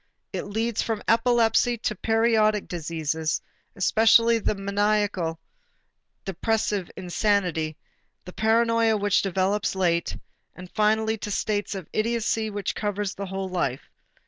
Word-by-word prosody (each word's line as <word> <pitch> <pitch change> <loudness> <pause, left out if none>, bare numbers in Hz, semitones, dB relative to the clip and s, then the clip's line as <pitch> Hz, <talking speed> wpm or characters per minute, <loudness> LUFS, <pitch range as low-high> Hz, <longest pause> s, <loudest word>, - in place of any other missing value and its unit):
It - - -3
leads 220 +2 -1
from 220 -2 -3
epilepsy 235 0 +3
to 215 - -2
the 200 - -20
periodic 220 -2 +2
diseases, 160 -2 -2 0.4
especially 225 +3 +4
the 215 - -1
maniacal 200 -4 0 0.9
depressive 200 0 -1
insanity, 180 -4 0 0.5
the 180 - -9
paranoia 225 +1 +2
which 205 0 +2
develops 195 +2 0
late, 170 -3 0 0.4
and 185 -1 -11
finally 220 +1 +1
to 210 - -5
states 205 0 -1
of 190 -4 -7
idiocy 225 0 0
which 205 -2 -3
cover 205 -1 -2
the 200 0 -4
whole 190 0 -4
life. 155 -8 -3
205 Hz, 120 wpm, -25 LUFS, 185-220 Hz, 0.9 s, especially